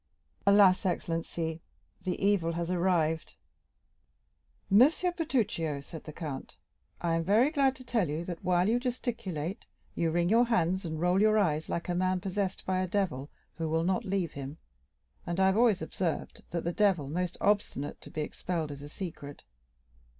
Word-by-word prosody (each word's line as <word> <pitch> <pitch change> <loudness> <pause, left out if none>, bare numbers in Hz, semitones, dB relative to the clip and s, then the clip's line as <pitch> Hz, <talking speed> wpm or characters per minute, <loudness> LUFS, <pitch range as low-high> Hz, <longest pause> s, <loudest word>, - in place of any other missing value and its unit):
"Alas! 200 -2 +6
excellency, 165 -2 -2 0.4
the 180 - -1
evil 195 -4 +2
has 170 +1 -2
arrived!" 170 -3 +1 1.4
"M. 200 - +7 0.4
Bertuccio," 215 - 0
said 155 +3 -10
the 155 - -7
count, 150 -4 -6 0.4
"I 170 -1 0
am 165 0 +1
very 220 - +4
glad 275 -4 +2
to 255 - -11
tell 230 - 0
you, 155 +3 -3
that 175 -2 -6
while 180 0 +3
you 235 +3 +3
gesticulate, 225 - -3 0.3
you 165 - 0
wring 170 +1 +1
your 230 +5 +5
hands 190 -5 +1
and 160 -1 -4
roll 180 +3 +3
your 215 0 +5
eyes 160 -6 +1
like 170 - -2
a 175 - 0
man 185 +1 +1
possessed 190 +1 -3
by 185 0 0
a 185 - 0
devil 175 -8 -1 0.3
who 160 -1 -1
will 160 +1 +1
not 190 +6 +1
leave 190 -5 -1
him; 140 +2 -7 0.7
and 170 +2 -2
I 190 - +5
have 190 +2 +3
always 225 -5 +4
observed, 175 -4 -3
that 170 -1 -3
the 170 - -1
devil 190 -9 +2
most 180 +4 -2
obstinate 200 -8 0
to - - -11
be 155 - -4
expelled 160 0 -3
is 140 0 -8
a 145 - -9
secret. 145 -5 -7
180 Hz, 170 wpm, -30 LUFS, 160-200 Hz, 1.4 s, M